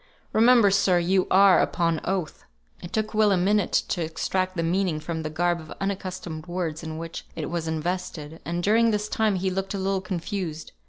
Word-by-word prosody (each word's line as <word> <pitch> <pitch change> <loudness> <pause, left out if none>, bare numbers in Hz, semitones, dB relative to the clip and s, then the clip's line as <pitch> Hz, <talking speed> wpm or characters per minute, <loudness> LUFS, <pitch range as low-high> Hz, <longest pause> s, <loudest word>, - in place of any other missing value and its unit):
Remember, 230 -2 +6
sir, 195 -2 +3
you 180 +2 +2
are 195 0 +6
upon 165 -2 0
oath." 185 -4 -3 0.4
It 175 - -8
took 215 0 -1
Will 215 -1 +4
a 195 - +3
minute 200 +2 +2 0.2
to 175 - -1
extract 185 +3 -2
the 165 - 0
meaning 175 -1 0
from 160 +1 -4
the 155 - -4
garb 175 +2 0
of 155 -1 -11
unaccustomed 185 -4 -4
words 175 -3 -3
in 160 -1 -6
which 165 0 -6
it - - -4
was 170 -2 -2
invested, 160 -1 -4
and 170 +1 -3
during 225 +4 +4
this 210 -1 0
time 215 -2 +1
he 190 +1 -1
looked 195 +2 -3
a - - -2
little 195 0 0
confused. 180 -3 -4
180 Hz, 195 wpm, -25 LUFS, 165-195 Hz, 0.4 s, Remember